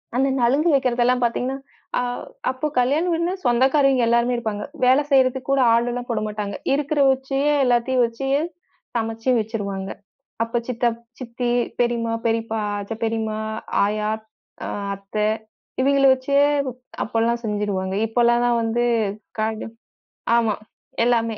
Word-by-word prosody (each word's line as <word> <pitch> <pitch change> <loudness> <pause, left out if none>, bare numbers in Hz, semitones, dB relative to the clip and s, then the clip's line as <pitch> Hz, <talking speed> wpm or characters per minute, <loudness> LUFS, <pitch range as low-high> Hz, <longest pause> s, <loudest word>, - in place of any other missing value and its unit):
அந்த 265 +2 +3
நலுங்கு 275 +8 +3
வைக்கிறது 255 -3 +2
எல்லாம் 250 +1 +2
பார்த்தீங்கன்னா, 250 +3 0 0.4
அ - - +1 0.5
அப்போ 260 +4 -2
கல்யாண 275 +6 +2
வீடுன்னா 335 +2 0
சொந்தக்காரவிங்க 265 +1 +3
எல்லாருமே 235 +1 +2
இருப்பாங்க. 220 -3 -3 0.2
வேலை 260 +3 +5
செய்யறதுக்கு 260 -1 +3
கூட 275 -1 +3
ஆள் 235 +1 +2
எல்லாம் 245 0 -5
போடமாட்டாங்க. 210 -2 -3 0.2
இருக்கிற 290 +1 0
வச்சே 265 +1 -1 0.2
எல்லாத்தையும் 245 +1 +2
வச்சே 235 +4 -4 0.7
சமைச்சு 225 +1 -2
வச்சிருவாங்க. 200 -3 -4 0.5
அப்போ 230 +1 -2
சித்தப் 235 -2 0 0.2
சித்தி, 245 -1 -3 0.3
பெரியம்மா, 235 -1 0
பெரியப்பா, 225 -1 0 0.2
அத்த 200 +3 -5
பெரியம்மா, 220 -1 -1 0.5
ஆயா 210 +1 -1 0.6
அ - - -4 0.3
அத்தே 200 +2 -2 0.5
இவிங்கள 275 +1 +3
வச்சே 265 +2 +1 0.6
அப்பல்லாம் 230 +1 0
செஞ்சிருவாங்க. 205 -3 -2
இப்போல்லாம் 240 +1 +3
தான் 240 -1 +2
வந்து 230 +1 0 0.6
கட 220 0 -2 0.7
ஆமா. 225 -3 +2 0.5
எல்லாமே. 230 -2 +1
235 Hz, 125 wpm, -22 LUFS, 225-260 Hz, 0.7 s, வேலை